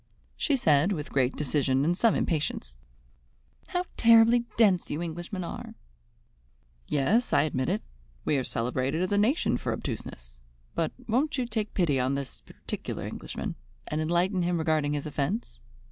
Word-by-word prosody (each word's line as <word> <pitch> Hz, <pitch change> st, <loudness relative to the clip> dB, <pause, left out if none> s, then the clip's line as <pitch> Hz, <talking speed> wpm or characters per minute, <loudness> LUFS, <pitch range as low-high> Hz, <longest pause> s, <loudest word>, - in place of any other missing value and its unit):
She 290 Hz, -, +1 dB
said 155 Hz, -, +3 dB
with 150 Hz, -5 st, -5 dB
great 130 Hz, -1 st, +2 dB
decision 140 Hz, -2 st, +1 dB
and 170 Hz, +2 st, +2 dB
some 225 Hz, +3 st, +3 dB
impatience: 145 Hz, -, -1 dB, 0.9 s
"How 360 Hz, -1 st, -1 dB
terribly 230 Hz, +1 st, +6 dB
dense 200 Hz, -6 st, +4 dB
you 150 Hz, -, -2 dB
Englishmen 175 Hz, +3 st, -4 dB
are!" 170 Hz, -, -7 dB, 1.1 s
"Yes, 205 Hz, -, +2 dB
I 145 Hz, -1 st, +5 dB
admit 130 Hz, -4 st, -1 dB
it. -, -, -1 dB, 0.4 s
We -, -, +2 dB
are 130 Hz, -, 0 dB
celebrated 130 Hz, +7 st, -1 dB
as 185 Hz, -, -2 dB
a 205 Hz, -, +3 dB
nation 215 Hz, -, +2 dB
for -, -, -3 dB
obtuseness. -, -, -6 dB, 0.3 s
But 165 Hz, -, 0 dB, 0.2 s
won't 270 Hz, +7 st, +1 dB
you 255 Hz, -, 0 dB
take 215 Hz, -2 st, -3 dB
pity 155 Hz, -8 st, +2 dB
on 130 Hz, +2 st, +1 dB
this 140 Hz, -2 st, -5 dB
particular -, -, -6 dB
Englishman, -, -, -5 dB, 0.3 s
and 155 Hz, +1 st, -1 dB
enlighten 175 Hz, +4 st, +1 dB
him 175 Hz, 0 st, +1 dB
regarding 155 Hz, -2 st, +1 dB
his 145 Hz, -1 st, -2 dB
offence. 150 Hz, -, -3 dB
160 Hz, 155 wpm, -28 LUFS, 140-210 Hz, 1.1 s, terribly